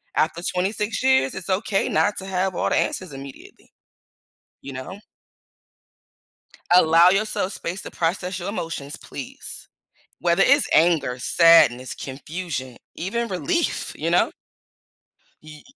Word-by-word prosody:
After 165 +2 0
26 200 +6 -1
years, 260 - +3
it's 190 0 -6
okay 195 +1 0
not 205 0 +1
to 190 - -8
have 185 -1 -1
all - - 0
the - - +1
answers 180 -6 -2
immediately, 135 0 -12 0.9
you 140 - -8
know? 130 +10 -7 1.7
Allow 170 0 +6
yourself 195 -1 0
space 175 +3 -5
to - - -9
process 180 +2 -2
your 185 +3 -4
emotions, 165 -7 -5
please. 135 - -8 0.5
Whether 170 +2 +3
it's 280 +2 +4
anger, 155 -7 +3
sadness, 135 -5 +5
confusion, 135 -2 -6 0.2
even 230 +6 -2
relief, 335 - -1
you - - -2
know? - - +3 1.1
Ye 155 -1 -12
175 Hz, 120 wpm, -23 LUFS, 150-195 Hz, 1.7 s, Allow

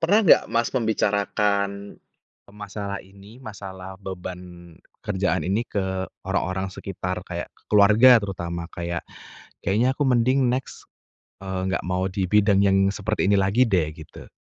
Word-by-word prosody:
Pernah 185 +5 +4
nggak, - - +7
Mas, 115 0 +2
membicarakan 100 -3 0 0.6
masalah 100 -1 -6
ini? 100 +5 -16
Masalah 95 -4 -9
beban 90 -3 -9 0.3
kerjaan 95 -6 -1
ini 105 +5 0
ke 95 -4 -2 0.2
orang-orang 95 +1 -1
sekitar 90 -1 -5
kayak 85 -1 -5 0.2
keluarga 110 +4 +7
terutama, 85 -4 -5
kayak, 85 -1 -4 0.6
"Kayaknya 120 +7 +1
aku 145 - -2
mending 125 +1 +3
next, 130 +1 -4 0.6
eee, 95 -1 -4
nggak 100 - -1
mau 90 0 0
di 95 -1 -2
bidang 100 -1 +4
yang 95 -1 +3 0.2
seperti 110 +1 -1
ini 100 - +3
lagi, 100 +6 +3
deh." 90 -8 +1
Gitu? 80 -1 -13
100 Hz, 135 wpm, -24 LUFS, 95-105 Hz, 0.6 s, nggak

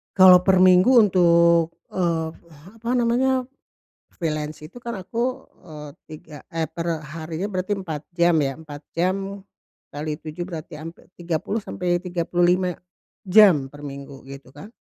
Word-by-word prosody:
Kalo 185 -2 +8
per 185 -1 +5
minggu 185 +6 +6
untuk, 170 -5 +4 0.2
eee, 165 -3 -1 0.5
apa 235 +1 -5
namanya, 250 +2 +1 0.7
freelance 155 -2 -4
itu 240 +8 -14
kan 235 -4 -5
aku, 235 +7 -3 0.2
eee, 150 -3 -10 0.2
3, 155 0 -11
eh, 165 -1 -2
per 165 -1 -3 0.2
harinya 165 +3 -4
berarti 195 0 -3
4 160 -6 -5
jam 170 0 +2
ya 135 0 -1
4 150 -2 -10
jam 180 +2 0 0.8
kali 150 +1 -4
7 155 +2 -7
berarti 165 -3 -7
hampir 165 +3 -10
30 175 +5 -3
sampai 175 -1 -2
35, 180 0 0 0.5
jam 185 -9 +5
per 145 0 -10
minggu 140 -1 -10
gitu 135 -1 -11
kan. 145 +9 -12
170 Hz, 140 wpm, -23 LUFS, 155-185 Hz, 0.8 s, Kalo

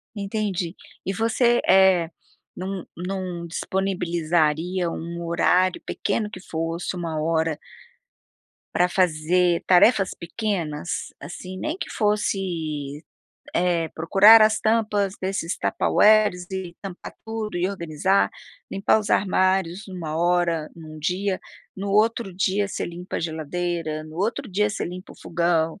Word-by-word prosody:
Entendi. 200 -4 -2 0.3
E 195 - -1
você, 235 +3 +2
eh, 190 -3 +5 0.5
não, 190 0 -5
não 180 -1 -4
disponibilizaria 175 -2 0
um 170 +1 -5
horário, 180 +2 +2
pequeno 210 +1 -1
que 195 - -9
fosse, 165 +1 -3
1 165 -3 -3
hora 160 -1 0 1.1
pra 180 - +3
fazer 175 0 +2
tarefas 190 +1 +5
pequenas? 175 -4 -3
Assim, 180 +5 -8
nem 310 - -2
que - - -5
fosse, 170 - -1 0.5
eh, 170 -2 +1
procurar 200 +7 +7
as 215 0 +4
tampas 210 -3 +1
desses 190 -2 -2
tupperwares 210 -4 +3
e 190 -2 -5
tampar 190 -3 -8
tudo, 220 -3 -4
e 175 +1 +1
organizar, 185 0 +1 0.4
limpar 195 +2 +3
os 210 -2 -4
armários 185 -1 +1
numa 170 -5 -5
hora, 170 -2 +1
num 155 -2 -10
dia. 185 +5 -1 0.4
No 200 +1 -3
outro 215 -1 +2
dia 195 +2 +1
você 200 - -4
limpa 175 +1 -6
a - - -2
geladeira, 160 0 -3
no 155 0 -11
outro 230 +6 -2
dia 210 +3 +2
você 205 - -3
limpa 180 +1 -8
o - - -18
fogão. 170 0 0
180 Hz, 125 wpm, -24 LUFS, 170-200 Hz, 1.1 s, procurar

